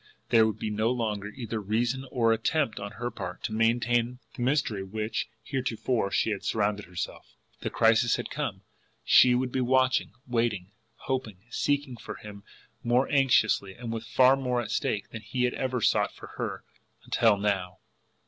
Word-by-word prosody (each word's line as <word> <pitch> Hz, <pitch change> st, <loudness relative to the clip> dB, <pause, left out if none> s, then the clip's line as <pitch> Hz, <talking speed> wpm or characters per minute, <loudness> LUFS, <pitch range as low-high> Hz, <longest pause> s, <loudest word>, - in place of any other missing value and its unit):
There 110 Hz, -1 st, +6 dB
would 110 Hz, -, -3 dB
be 110 Hz, -, -3 dB
no 110 Hz, +2 st, +1 dB
longer 110 Hz, -5 st, -1 dB
either 110 Hz, 0 st, -5 dB
reason 120 Hz, +6 st, -1 dB
or 115 Hz, -3 st, +3 dB
attempt 115 Hz, +1 st, 0 dB
on 100 Hz, +1 st, -6 dB
her 120 Hz, +2 st, -4 dB
part -, -, -7 dB
to 110 Hz, -, -3 dB
maintain 120 Hz, +2 st, +2 dB, 0.2 s
the -, -, -6 dB
mystery 125 Hz, -6 st, +1 dB
with 95 Hz, +1 st, -10 dB
which 110 Hz, 0 st, -2 dB
she 135 Hz, -, -4 dB
had 130 Hz, -1 st, -1 dB
heretofore 115 Hz, -2 st, 0 dB, 0.3 s
surrounded 105 Hz, -1 st, 0 dB
herself, 90 Hz, -1 st, -6 dB, 0.2 s
the -, -, -3 dB
crisis 115 Hz, +1 st, +4 dB
had -, -, -5 dB
come, -, -, -3 dB, 0.4 s
she 125 Hz, -1 st, +6 dB
would 125 Hz, 0 st, 0 dB
be 130 Hz, -, 0 dB
watching, 130 Hz, 0 st, +2 dB
waiting, 115 Hz, -6 st, -1 dB, 0.3 s
hoping, 115 Hz, -8 st, -3 dB
seeking 145 Hz, -3 st, 0 dB
for -, -, -7 dB
him 100 Hz, -1 st, -11 dB, 0.4 s
more 125 Hz, +3 st, +3 dB
anxiously 115 Hz, -8 st, +3 dB
and 115 Hz, -2 st, -5 dB
with 115 Hz, -, -5 dB
far 130 Hz, +1 st, +5 dB
more 125 Hz, -2 st, -1 dB
at 110 Hz, -4 st, -4 dB
stake 105 Hz, -, -1 dB
than 110 Hz, -, -7 dB
he 125 Hz, +4 st, -2 dB
had 125 Hz, -, +2 dB
ever 130 Hz, -2 st, -2 dB
sought -, -, +2 dB
for -, -, -11 dB
her -, -, -4 dB, 0.4 s
until 110 Hz, -3 st, +3 dB
now! 95 Hz, -3 st, -1 dB
115 Hz, 175 wpm, -28 LUFS, 105-125 Hz, 0.4 s, There